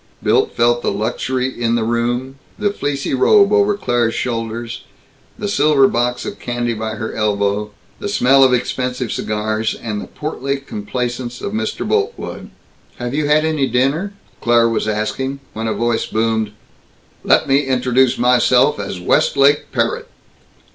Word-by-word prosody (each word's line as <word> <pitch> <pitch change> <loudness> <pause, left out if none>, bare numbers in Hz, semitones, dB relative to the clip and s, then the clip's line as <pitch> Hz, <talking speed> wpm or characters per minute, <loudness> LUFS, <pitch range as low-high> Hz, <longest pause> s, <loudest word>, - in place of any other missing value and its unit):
Milt - - +2
felt 120 +1 +3
the - - 0
luxury 125 +5 -1
in 120 -3 -1
the 115 - 0
room 120 +3 -1 0.2
the 205 -1 0
fleecy 140 -7 -2
robe 200 +9 +4
over 205 0 +3
Claire's 120 - 0
shoulders, 115 0 -3 0.5
the 205 - -3
silver 150 -7 +4
box 125 +1 -1
of - - -6
candy 120 -1 -2
by 110 0 -4
her 110 +1 -5
elbow, 105 -1 0 0.3
the 205 - -4
smell 135 -7 +4
of 130 - +5
expensive 125 0 -1
cigars, 110 +1 -2
and 105 -3 -4
the - - -8
portly 140 -2 -3
complacence 120 0 -4
of 200 - -5
Mr. 220 - -2
Boltwood. 435 +2 -2 0.5
"Have 120 0 -5
you 150 0 0
had 155 +1 +3
any 155 -4 +1
dinner?" 140 - 0 0.3
Claire 120 -1 +4
was 115 -1 -1
asking, 120 +6 -2
when 110 +1 -3
a 110 - 0
voice 120 -1 0
boomed, 110 -1 0 0.7
"Let - - +3
me 135 +1 +4
introduce 130 0 +2
myself 125 +2 +3
as 100 -2 -5
Westlake 140 +10 +2
Parrott." - - -1
125 Hz, 150 wpm, -18 LUFS, 115-135 Hz, 0.7 s, of